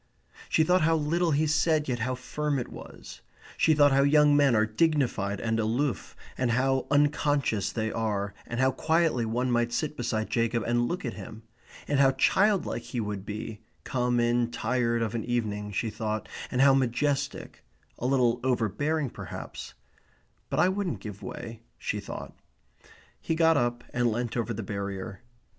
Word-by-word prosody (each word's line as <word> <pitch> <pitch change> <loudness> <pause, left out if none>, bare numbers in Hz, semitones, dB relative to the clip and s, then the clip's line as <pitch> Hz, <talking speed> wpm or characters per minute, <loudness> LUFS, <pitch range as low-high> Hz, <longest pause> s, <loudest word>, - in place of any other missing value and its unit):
She 160 - +4
thought 180 +3 +3
how 165 +1 +3
little 165 +3 +1
he 155 +1 +2
said 155 0 +2
yet 125 -2 -1
how 130 +3 -1
firm 145 +3 -2
it 125 - -4
was. - - -11 0.3
She 160 - +3
thought 145 -1 +5
how 135 +1 +4
young 145 +1 +5
men 140 -4 +4
are 110 0 +4
dignified 110 -6 0
and 115 0 -1
aloof, 115 +2 -1 0.2
and 130 -2 +1
how 130 +2 +1
unconscious 145 -6 +1
they 110 -1 -2
are, 105 -3 -2
and 120 - -4
how 130 0 +4
quietly 160 -6 +1
one 125 +3 0
might 120 0 +1
sit 150 +4 -2
beside 110 -4 -2
Jacob 115 -1 +1
and 120 0 +1
look 175 0 -3
at 120 - -3
him. 110 0 -9 0.4
And 145 -1 +1
how 135 -1 +5
childlike 195 +9 +2
he 125 - -5
would 105 -2 -4
be, 105 +1 -5 0.2
come 125 -1 0
in 120 0 +2
tired 120 0 0
of 110 - -3
an 115 - -2
evening, 105 -4 -2
she 110 +2 -2
thought, 110 0 -3 0.2
and 125 - 0
how 135 0 +7
majestic; 135 +2 -1 0.4
a 125 - -1
little 125 -3 +2
overbearing 130 +4 0
perhaps; - - -8 0.7
"But - - -1
I - - +5
wouldn't 190 -2 -2
give 105 -2 -8
way," 115 -1 -7 0.2
she - - -3
thought. - - -7 0.9
He 165 - -2
got 165 0 +4
up 120 -2 0
and 120 -1 +2
leant 120 +1 -2
over 120 -1 -1
the 110 0 -4
barrier. 100 +1 -5
120 Hz, 170 wpm, -28 LUFS, 115-145 Hz, 0.9 s, how